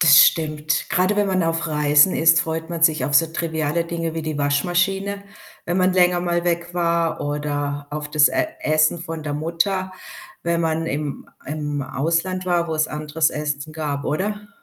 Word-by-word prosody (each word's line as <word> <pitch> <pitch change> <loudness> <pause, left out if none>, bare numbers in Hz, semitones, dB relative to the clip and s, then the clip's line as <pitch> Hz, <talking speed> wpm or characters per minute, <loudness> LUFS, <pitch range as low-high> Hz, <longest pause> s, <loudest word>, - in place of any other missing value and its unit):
Das 155 -3 +7
stimmt. 155 -1 0
Gerade 185 +4 +2
wenn 205 -1 +2
man 185 -2 +1
auf 165 0 -1
Reisen 150 +2 +4
ist, 165 0 +5
freut 160 +1 -4
man 165 -1 -4
sich 155 -5 +3
auf 145 +2 -2
so 165 +3 +5
triviale 160 0 -2
Dinge 165 -1 -4
wie 160 - -3
die 155 -2 -4
Waschmaschine, 180 +7 0 0.4
wenn 175 +1 -1
man 185 0 +3
länger 180 -1 +3
mal 175 0 -1
weg 170 0 -1
war 170 -1 0
oder 145 -1 -3
auf 150 0 -5
das 150 0 +4
E 325 -1 0
Essen 155 +2 +2
von 165 -1 -6
der 145 -1 -3
Mutter, 170 +5 -1 0.5
wenn 170 0 +1
man 160 0 -1
im 145 -1 -4 0.2
im 145 -1 -3
Ausland 165 +8 -1
war, 175 -2 +1
wo 160 - -2
es 155 - +2
anderes 155 +1 -1
Essen 150 0 -4
gab, 150 -2 -3
oder? 205 +6 -3
160 Hz, 180 wpm, -21 LUFS, 150-175 Hz, 0.5 s, Das